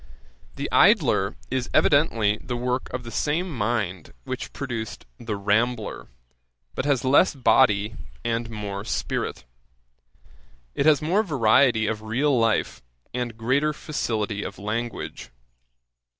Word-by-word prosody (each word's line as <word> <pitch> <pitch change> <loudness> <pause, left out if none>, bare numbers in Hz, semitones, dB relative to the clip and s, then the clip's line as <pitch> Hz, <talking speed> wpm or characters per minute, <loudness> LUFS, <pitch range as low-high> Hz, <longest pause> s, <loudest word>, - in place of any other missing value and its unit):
The - - -3
Idler 95 +2 +4 0.2
is 130 -1 -1
evidently 115 -8 +3
the 120 - -3
work 125 +1 -2
of 125 0 -4
the 115 - -8
same 155 - -1
mind 105 -6 -2
which - - -5
produced 120 -5 -5
The 115 -3 -4
Rambler, 110 +3 0 0.7
but - - -3
has 140 -4 +1
less 145 +6 +4
body 110 -4 +3 0.3
and 115 0 -1
more 105 -3 -5
spirit. 105 - -3 1.3
It 145 - +1
has 150 -2 +5
more 180 +7 +2
variety 125 - +3
of 110 0 -2
real 130 +6 +1
life, 115 -3 +1 0.3
and 120 -2 -3
greater 135 +7 +1
facility 110 -9 -2
of - - -6
language. 110 - -4
120 Hz, 120 wpm, -24 LUFS, 110-135 Hz, 1.3 s, has